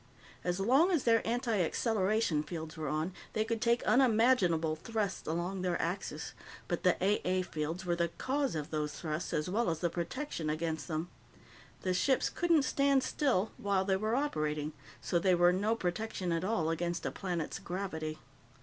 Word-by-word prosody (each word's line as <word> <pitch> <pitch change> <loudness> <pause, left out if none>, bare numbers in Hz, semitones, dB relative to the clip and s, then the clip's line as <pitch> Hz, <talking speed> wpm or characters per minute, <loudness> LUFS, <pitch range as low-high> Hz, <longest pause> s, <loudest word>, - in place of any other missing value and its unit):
As 180 +1 -1
long 265 - +4
as 335 -8 +2
their 230 -1 +4
antiacceleration 220 - +1
fields 160 -2 -6
were 155 -1 -4
on, 155 +5 -1 0.2
they 215 0 +1
could 225 -1 -2
take 235 0 +2
unimaginable 220 -10 +4
thrusts 210 +3 -3
along 175 +4 -2
their 180 -2 0
axes, 175 +4 -3 0.3
but - - -1
the - - +4
A 200 +3 +2
A 185 0 +1
fields 165 +2 -4
were 175 -1 +1
the 170 0 +1
cause 270 - -1
of 150 -2 -4
those 150 -1 -1
thrusts 155 0 -3
as 150 - 0
well 220 +4 +1
as 165 - 0
the 170 +1 -1
protection 175 - -3
against 155 -2 -2
them. 160 +2 -3 0.7
The 185 - 0
ships 260 +8 +2
couldn't 335 -4 +3
stand 275 0 +3
still 230 -9 +1
while 195 -2 +1
they 190 -1 +2
were 215 +4 0
operating, 155 - -1 0.3
so 175 - +1
they 185 +1 +4
were 175 +1 +5
no 210 +5 +1
protection 185 -2 -2
at 165 +1 0
all 180 -6 +1
against 170 +1 -2
a - - -1
planet's 175 -5 -3
gravity. 160 -4 -4
185 Hz, 175 wpm, -32 LUFS, 165-225 Hz, 0.7 s, were